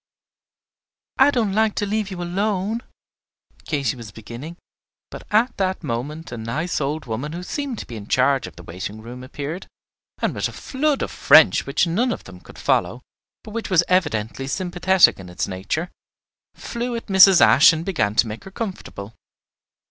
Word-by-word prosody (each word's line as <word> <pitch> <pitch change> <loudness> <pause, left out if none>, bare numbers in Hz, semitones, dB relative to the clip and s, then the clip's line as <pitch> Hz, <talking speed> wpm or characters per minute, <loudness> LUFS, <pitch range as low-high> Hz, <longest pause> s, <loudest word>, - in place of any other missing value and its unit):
"I 270 +2 +7
don't 230 -8 0
like 220 0 +2
to 205 - -1
leave 210 0 -1
you 180 -2 -5
alone," 200 +4 -1 0.9
Katy 140 -6 -1
was 115 -4 -10
beginning; 120 +11 -9 0.5
but - - -10
at 225 +4 +2
that 190 -2 -1
moment 145 +5 -4
a 120 - -5
nice 150 +10 -2
old 150 +2 -2
woman 125 +6 -4
who 175 +1 -6
seemed 275 +3 -4
to - - -6
be 115 - -8
in 100 -1 -9
charge 130 -3 +2
of 85 - -13
the 90 - -12
waiting 95 +6 -7
room 125 +2 -9
appeared, 145 +6 -6 0.5
and - - 0
with - - -1
a - - -9
flood 285 +1 -1
of - - -4
French - - +5
which - - +2
none 220 +10 +1
of - - -5
them 95 -2 -12
could - - -15
follow, - - 0 0.4
but 215 - -10
which 230 0 -4
was 175 -3 +4
evidently 135 - 0
sympathetic 180 - +3
in 90 -1 -10
its 90 - -3
nature, 100 - -3 0.6
flew 240 +1 -4
at 230 - -5
Mrs. 190 -2 +7
Ashe 145 - +7
and 160 0 -3
began 110 - 0
to 115 - +4
make 110 +1 -7
her - - -8
comfortable. 185 - -6
165 Hz, 180 wpm, -22 LUFS, -, 0.9 s, I